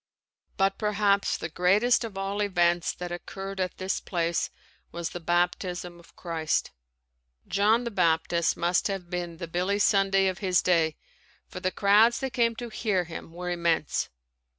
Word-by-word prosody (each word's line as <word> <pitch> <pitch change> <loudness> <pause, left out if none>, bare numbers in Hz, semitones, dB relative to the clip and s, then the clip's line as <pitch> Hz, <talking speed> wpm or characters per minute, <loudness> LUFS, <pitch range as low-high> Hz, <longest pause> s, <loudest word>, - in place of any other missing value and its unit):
But 195 0 +1
perhaps 205 -2 +2
the - - -4
greatest 200 +10 +3
of 215 -4 -6
all 195 +1 -2
events 175 -4 +2
that 180 -1 -7
occurred 195 +2 -6
at 185 -1 -2
this 190 +1 -2
place 170 -2 -1 0.4
was 170 -1 -4
the 175 - -6
baptism 175 +1 -1
of 170 - -20
Christ. 165 -3 -1 0.8
John 215 +4 +3
the 235 - -4
Baptist 170 -2 +1
must 175 +1 +1
have 190 -3 -5
been 175 -2 -4
the 170 - -6
Billy 180 +4 0
Sunday 195 -1 +3
of 185 -1 -1
his 185 -3 +2
day 165 -3 +2 0.5
for - - -8
the 185 0 0
crowds 210 +5 +4
that 265 -2 -3
came 230 -1 +2
to 240 +1 -6
hear 210 -4 0
him 165 -1 -9
were 180 +1 -5
immense. 170 -3 0
185 Hz, 160 wpm, -27 LUFS, 175-200 Hz, 0.8 s, crowds